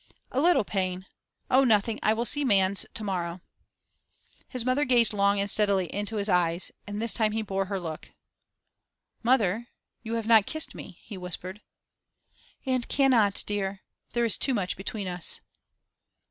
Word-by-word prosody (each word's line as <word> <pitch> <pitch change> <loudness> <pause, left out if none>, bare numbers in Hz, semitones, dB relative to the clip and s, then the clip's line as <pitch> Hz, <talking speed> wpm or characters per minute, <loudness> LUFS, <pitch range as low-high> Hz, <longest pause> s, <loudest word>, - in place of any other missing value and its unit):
'A 265 - 0
little 345 -6 +4
pain. 185 -2 -2 0.5
Oh, 265 +1 +5
nothing; 220 -2 +2
I 215 - +3
will 235 +2 -2
see 290 +3 +3
Manns 195 -5 +3
to 220 - -1
morrow.' 180 -3 -3 1.1
His 250 -3 -6
mother 255 +3 +2
gazed 240 -5 +3
long 200 0 +2
and 200 - 0
steadily 200 -3 +2
into 205 +2 -3
his 205 -1 0
eyes, 175 -2 +2 0.2
and 205 0 -5
this 230 0 +1
time 215 -2 +1
he 220 0 -1
bore 195 -1 -2
her 195 0 -3
look. 160 -3 -7 1.1
'Mother, 230 -2 +1 0.3
you 230 +1 -4
have 225 -1 -3
not 220 -3 +5
kissed 315 0 -2
me,' - - -11
he 200 -4 -9
whispered. 180 +2 -5 1.0
'And 255 -2 -1
cannot, 240 -8 +3
dear. 200 -2 -3 0.3
There 240 0 +1
is 230 - 0
too 265 - +1
much 185 -4 -2
between 195 +1 -5
us. 180 -2 -1
205 Hz, 160 wpm, -27 LUFS, 190-235 Hz, 1.1 s, Oh